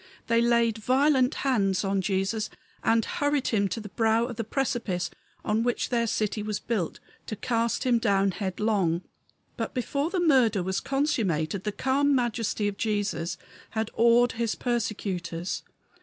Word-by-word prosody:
They 230 0 +3
laid 235 -2 +2
violent 260 +3 +3
hands 195 -8 +2
on 195 0 +1
Jesus 195 +3 -1 0.3
and 225 -1 +3
hurried 290 -2 0
him 200 -3 +2
to 225 - -4
the 210 -2 -8
brow 225 +2 +2
of 240 -1 -6
the 230 - -2
precipice 230 -7 -1 0.3
on 215 +1 +1
which 240 0 0
their 235 -2 +1
city 215 -1 -1
was 210 0 -2
built, 205 -9 -2 0.3
to 215 - -3
cast 230 +1 0
him 245 -2 +3
down 200 -3 +2
headlong. 190 -3 0 0.5
But - - -4
before 280 +5 -1
the 365 0 -1
murder 250 - +4
was 190 +1 -1
consummated 200 - 0
the 210 - 0
calm 275 +5 +2
majesty 230 -4 0
of 200 -1 -3
Jesus 205 -5 -1 0.3
had 220 0 -2
awed 235 +1 +4
his 230 -1 -1
persecutors. 190 -8 -2
225 Hz, 155 wpm, -27 LUFS, 200-245 Hz, 0.5 s, murder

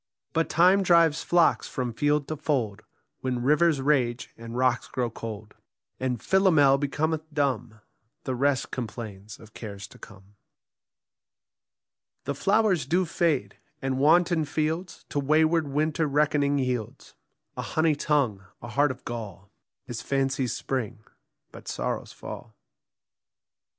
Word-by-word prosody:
But 165 0 +1
Time 180 +4 +5
drives 170 -4 +4
flocks 175 -1 +3
from 125 -2 -3
field 145 +3 +1
to 155 - -2
fold, 130 -9 -1 0.4
When 125 -2 -2
rivers 150 +1 +3
rage 130 -4 +1
and 115 +1 -8
rocks 125 -1 +1
grow 125 -3 -2
cold; 110 -2 -7 0.5
And 125 -2 -1
Philomel 160 -8 +4
becometh 155 +3 -2
dumb; 125 -7 -1 0.4
The 130 - -2
rest 135 +1 0
complains 105 -4 -7
of 110 0 -15
cares 100 -3 -8
to - - -16
come. 95 +2 -14 1.9
The 140 - -2
flowers 195 - +2
do 180 +5 +2
fade; 155 - 0 0.2
and 135 -1 -2
wanton 165 +2 +4
fields 160 +4 -3
To 145 - -1
wayward 155 +2 +3
winter 155 +2 0
reckoning 145 0 +2
yields: 125 -5 -3 0.4
A - - -3
honey 160 0 +1
tongue, 140 -9 0 0.2
a 120 - -9
heart 145 +6 +2
of 130 0 -7
gall, 105 -5 -7 0.3
Is 120 -2 -6
fancy's 135 -2 0
spring, 120 -4 -4 0.5
but - - -13
sorrow's - - -3
fall. - - -9
140 Hz, 130 wpm, -26 LUFS, 120-155 Hz, 1.9 s, Time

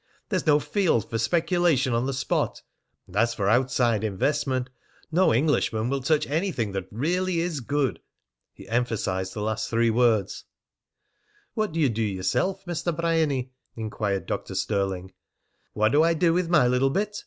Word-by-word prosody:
There's - - -1
no 150 -1 +5
field 165 - +1
for 115 - -3
speculation 165 - +2
on 120 +3 0
the - - 0
spot, 130 - -1 0.4
and 90 - -15
as 115 +3 +2
for 100 -3 -1
outside 120 -1 +2
investment, 130 +4 -1 0.4
no 185 +4 +4
Englishman 120 -3 +1
will 135 0 -1
touch 150 +3 +1
anything 150 - -1
that 95 -1 -4
really 175 - -1
is 165 -3 -2
good." 135 -1 -1 0.5
He - - -14
emphasised 105 -6 -1
the 105 - -3
last 110 0 -2
three 115 0 +2
words. 115 -4 +1 1.1
"What 215 -4 -1
d'ye 160 -3 +2
do 115 -2 -2
yeself, 110 - -1
Mr. 175 -1 -2
Bryany?" 160 -6 0 0.2
inquired 105 -3 -3
Dr. - - -4
Stirling. 95 -3 -2 0.6
"What 110 +1 +2
do 150 - +4
I 165 +1 +3
do 165 0 +3
with 175 -1 0
my 155 -7 +5
little 125 +2 +2
bit?" 210 +7 -1
130 Hz, 155 wpm, -25 LUFS, 110-165 Hz, 1.1 s, no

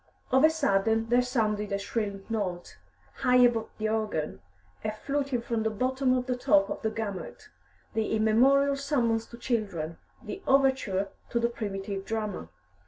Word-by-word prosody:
Of 265 +2 +5
a 315 - +8
sudden 225 -7 +1
there 245 +1 +5
sounded 215 -5 -1
a 200 - +1
shrill 200 0 -3
note, 185 - -4 0.4
high 250 - +2
above 240 -3 +4
the 215 0 -1
organ, 215 - -2 0.4
a 215 - -1
fluting 275 +2 -2
from 230 -2 -1
the 220 - +1
bottom 255 +4 +1
to 255 - +1
the - - +1
top 200 -5 +3
of - - -4
the 220 - 0
gamut, 215 -3 -6 0.4
the 220 -1 -1
immemorial 265 +6 +4
summons 240 -6 0
to 235 - -11
children, 195 -10 -2 0.2
the 390 - -6
overture 265 -8 +2 0.2
to 235 - 0
the 235 0 +1
primitive 200 -3 -4
drama. 210 - -4
225 Hz, 160 wpm, -28 LUFS, 205-250 Hz, 0.4 s, a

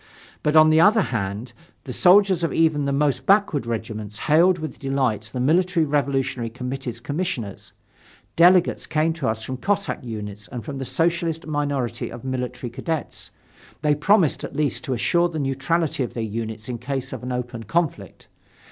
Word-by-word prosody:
But, 150 +1 +1
on 155 0 +7
the 160 +1 +5
other 210 +3 +5
hand, 105 +3 -3 0.3
the - - -6
soldiers 190 -1 +5
of 165 - 0
even 155 -3 +2
the 140 - 0
most 140 0 0
backward 195 - +3
regiments 110 -2 -4
hailed 170 +8 +4
with 155 -5 -6
delight 130 -6 -1
the 125 - -4
Military 170 +5 +2
Revolutionary 135 -4 -1
Committee's 125 0 -5
commissioners. 140 - -4 0.6
Delegates 175 +1 +4
came 160 +1 +1
to 155 -5 -3
us 110 -1 -2
from 130 +3 -5
Cossack 200 +3 -1
units 105 -3 -7
and 120 -3 -7
from 140 -3 -5
the 135 - -4
Socialist 165 +2 0
minority 140 -6 -2
of 120 - -9
military 125 -2 -4
cadets. 160 +5 -4 0.5
They 150 -1 +4
promised 165 +2 +3
at - - -6
least 150 -2 0
to 130 - -1
assure 170 +8 +2
the 160 - -5
neutrality 145 +3 0
of 125 - -3
their 115 - -2
units 110 0 -5
in 120 -2 -4
case 135 +1 -4
of - - -7
open 120 -2 -4
conflict. 165 - -2
140 Hz, 165 wpm, -23 LUFS, 120-165 Hz, 0.6 s, on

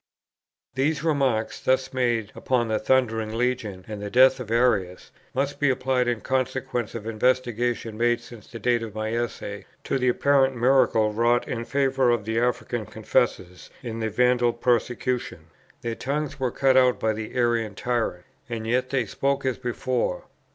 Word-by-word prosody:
These 140 +3 0
remarks, 135 -8 0
thus 130 0 +1
made 120 -4 0
upon 125 -3 0
the 110 - +1
Thundering 115 -3 +1
Legion 115 -6 -2
and 105 -2 -6
the 105 - -4
death 130 +3 +5
of 120 -4 -7
Arius, 110 -6 +1 0.2
must 140 +2 -1
be 145 - +3
applied, 130 -1 +1
in 120 -2 -1
consequence 130 -3 -2
of 110 -2 -6
investigations 120 -1 0
made 120 0 +2
since 120 -3 -13
the 120 - -9
date 120 +1 +1
of 110 -2 -7
my 110 +1 -2
Essay, 110 -4 -4 0.2
to 135 - -1
the 125 0 +2
apparent 135 +1 +3
miracle 120 -3 +3
wrought 120 +2 +2
in 115 -1 -3
favour 135 0 +1
of 120 -4 +1
the 110 +1 0
African 120 -2 -1
confessors 90 0 -1
in 115 -2 -5
the 110 -1 -1
Vandal 125 +1 +2
persecution. 120 -8 -1 0.3
Their 115 - -3
tongues 145 +3 -3
were 130 -1 0
cut 130 +2 +2
out 125 -1 +4
by 110 -1 +1
the 110 0 -6
Arian 120 -4 +1
tyrant, 115 -8 -2 0.2
and 115 -2 -4
yet 125 +3 0
they 130 -3 0
spoke 140 +6 -1
as 130 -2 -1
before. 120 -6 -2
120 Hz, 165 wpm, -25 LUFS, 110-130 Hz, 0.3 s, death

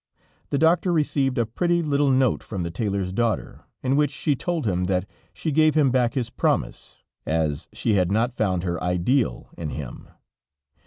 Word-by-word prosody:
The 140 - 0
doctor 170 +4 +3
received 140 -5 +1
a 120 - +2
pretty 170 +9 0
little 145 -2 +2
note 130 -2 +2
from 95 -5 -5
the 85 - -4
tailor's 100 -1 -2
daughter, 115 +1 -2 0.2
in 130 +1 +1
which 145 -1 +3
she 145 +1 0
told 170 +1 -2
him 90 -3 0
that 90 +1 0 0.2
she 160 - -3
gave 155 +1 +4
him 145 -4 +4
back 125 0 +1
his 120 -4 -2
promise, - - -2 0.2
as 80 -2 -1
she 110 - 0
had 90 -2 +2
not 115 +4 +1
found 95 -7 0
her 85 -2 -2
ideal 90 - 0
in 80 -3 -3
him. 70 -5 -7
120 Hz, 175 wpm, -24 LUFS, 90-145 Hz, 0.2 s, gave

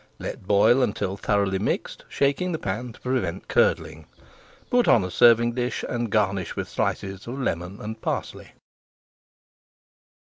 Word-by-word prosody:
Let 95 - -7
boil 105 +6 +5
until 100 -5 -1
thoroughly 100 -1 0
mixed, 100 - -3
shaking 145 +6 0
the - - -1
pan 115 +1 -4
to - - -17
prevent 125 -9 -2
curdling. - - +1 0.6
Put 245 -1 +3
on 110 - +5
a 90 - -4
serving 120 +3 +5
dish, 125 0 -2
and 120 -2 -2
garnish 100 -4 0
with - - -3
slices 95 +2 -3
of 125 +3 -5
lemon 90 -4 -3
and 110 +1 -7
parsley. - - -4
110 Hz, 140 wpm, -25 LUFS, 95-125 Hz, 0.6 s, boil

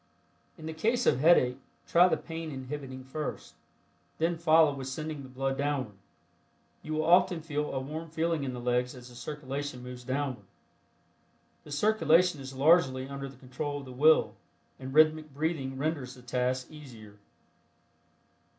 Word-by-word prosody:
In 155 - -10
the 160 - -4
case 230 +10 0
of - - +3
headache, 135 -5 +4 0.3
try 175 +2 +5
the - - +1
Pain 165 -1 -6
Inhibiting 130 -1 -6
first, 150 +3 -5 0.6
then 165 +2 +1
follow 160 -2 +5
with 135 -2 -6
sending 155 +2 -5
the 130 - -10
blood 135 +1 -2
downward. 135 -8 -2 0.8
You 155 - -5
will 155 0 0
often 180 0 +4
feel 150 -2 -2
a 135 - -2
warm 155 +5 -6
feeling 165 -1 -1
in 130 -2 -3
the 125 - -6
legs 125 +1 0
as 125 -1 -11
the 120 - -14
circulation 140 0 -5
moves 125 0 -8
downward. 130 +1 -3 1.2
The 150 - -11
circulation 175 -2 +3
is 135 0 -8
largely 135 -3 +4
under 140 0 -6
the 135 - -15
control 135 +3 -5
of 140 - -8
the 130 - -9
will 155 +5 +4 0.5
and 130 0 -7
rhythmic 155 0 +3
breathing 145 -4 -2
renders 140 -3 -2
the 125 - -15
task 125 +2 -1
easier. 115 -9 -12
140 Hz, 160 wpm, -29 LUFS, 130-155 Hz, 1.2 s, try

